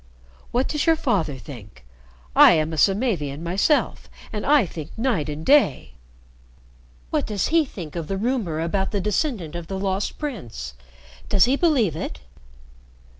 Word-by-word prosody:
"What 250 +2 0
does 300 +1 -2
your 325 - +6
father 190 - -1
think? 105 - -12 0.5
I - - +9
am 160 0 0
a - - -2
Samavian 170 - +1
myself, 195 - 0 0.2
and 210 - -3
I 285 -5 +5
think 160 -3 -8
night 220 - 0
and 150 +2 -6
day. 285 - +3 1.2
What - - 0
does 205 -3 -1
he 330 -1 +3
think 175 - -9
of 165 -3 -4
the 195 - -2
rumor 210 -8 -1
about 190 +4 -1
the 205 - -1
descendant 210 - -1
of 170 -1 -6
the 195 - -4
Lost 190 +1 -2
Prince? 120 - -6 0.6
Does 195 - +5
he 255 +3 +2
believe 275 - +2
it?" 110 - -5
190 Hz, 155 wpm, -23 LUFS, 155-250 Hz, 1.2 s, I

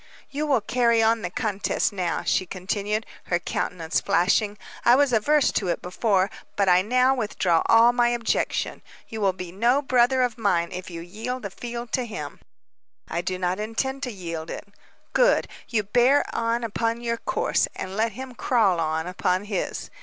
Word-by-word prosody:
"You 300 +2 -2
will 270 -6 +3
carry 235 +1 +2
on 225 0 +3
the 180 - -3
contest 205 0 -1
now," 180 -3 -2
she 185 - +1
continued, 200 +4 -2 0.2
her 175 - +1
countenance 170 -1 -2
flashing. 200 +2 +2 0.3
"I 240 - +6
was 280 -2 +3
averse 285 +6 +3
to 195 - -1
it 170 - 0
before, 190 +1 +1 0.2
but 200 -1 +1
I 180 0 +6
now 250 +5 +3
withdraw 205 -8 +1
all 230 +1 +6
my 240 -1 +3
objection. 240 -1 -1 0.3
You 220 -1 -5
will 195 -1 +3
be 180 -2 -7
no 235 +8 +2
brother 255 -1 +3
of 240 -2 -2
mine 175 -6 +1
if 185 0 -6
you 170 -1 -7
yield 225 +8 -5
the 200 - -5
field 235 +2 -6
to 255 - 0
him." 220 - -7 0.7
"I 170 - -1
do 185 +1 -3
not 180 +1 -1
intend 265 +5 -2
to 255 -3 -3
yield 170 -5 -6
it." - - -7 0.5
"Good. - - +3 0.2
You 220 -3 +1
bear 245 +7 +3
on 230 +1 0
upon 230 +1 -1
your 235 -1 -1
course, - - 0
and 190 +1 -6
let 220 +1 0
him 260 +3 -8
crawl 215 -8 +2
on 160 0 -1
upon 180 +1 0
his. 200 -3 -3
215 Hz, 180 wpm, -24 LUFS, 185-240 Hz, 0.7 s, I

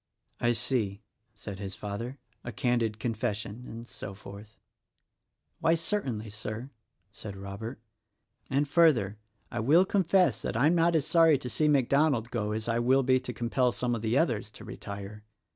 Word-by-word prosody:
"I 120 0 +2
see!" 110 -4 -1 0.3
said 100 -2 -8
his 100 -1 -5
father, 115 +6 -5
" - - -41
'a 120 - -5
candid 115 -2 0
confession' 110 0 -3
— - - -10
and 115 +1 -8
so 100 -4 -7
forth." 105 +1 -12 1.0
"Why, 165 0 +3
certainly, 130 - -2
Sir," 110 +5 -6 0.4
said 105 -1 -8
Robert, 100 +5 -7 0.7
"and 140 +2 +1
further, 135 - +3 0.3
I - - -3
will 155 - +5
confess 185 - +2
that - - -2
I'm 145 +7 +4
not 170 0 +3
as 150 -3 +2
sorry 165 -3 +5
to 125 -2 -6
see 155 - +2
MacDonald 140 -3 +2
go 105 -3 -1
as 110 +1 -3
I 115 0 +1
will 130 +3 +3
be 130 0 +4
to 125 -1 -5
compel 120 +2 +1
some 120 0 -1
of 115 - -2
the 115 +3 +1
others 120 -10 +1
to - - -13
retire. 100 +1 -8
120 Hz, 170 wpm, -29 LUFS, 105-140 Hz, 1.0 s, will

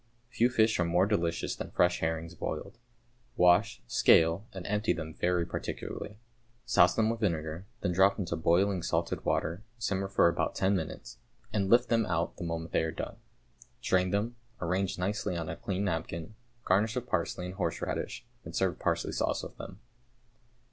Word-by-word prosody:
= 120 0 -39
Few 120 +2 +4
fish 110 -4 +3
are - - +4
more 90 +2 +3
delicious 85 -5 0
than - - -6
fresh 90 0 +2
herrings 80 +1 -2
boiled. 115 +6 -5 0.6
Wash, 90 - +4
scale, 80 - +4
and 95 -2 -8
empty 105 +2 +1
them 80 -1 -6
very 90 0 +1
particularly. 100 +4 -5 0.5
Souse 90 -2 +5
them 110 -1 +3
with 115 - -4
vinegar, 85 -2 -2
then 95 - 0
drop 95 +3 +4
into 90 -5 -2
boiling 90 +4 +2
salted - - -1
water, 85 +4 0 0.2
simmer 100 -3 -1
for 95 - +4
about 85 - 0
ten 95 +1 +2
minutes, 80 -4 -5 0.3
and 100 -2 +1
lift 120 +2 +5
them 115 -2 +2
out 85 -2 -1
the - - -5
moment 85 -1 -4
they - - +2
are 80 - -1
done. - - -6 0.6
Drain 90 0 +2
them, 105 +5 -1 0.2
arrange 90 +2 -1
nicely 90 -1 -1
on 80 -1 -4
a - - -3
clean 95 0 -3
napkin, 85 +1 -3 0.3
garnish 105 +5 +2
with 125 -1 -2
parsley 90 -3 -1
and 90 - -5
horseradish, 95 - -3 0.2
and - - -8
serve - - 0
parsley - - 0
sauce - - -1
with - - -8
them. 95 +2 -9
90 Hz, 175 wpm, -30 LUFS, 85-105 Hz, 0.6 s, Souse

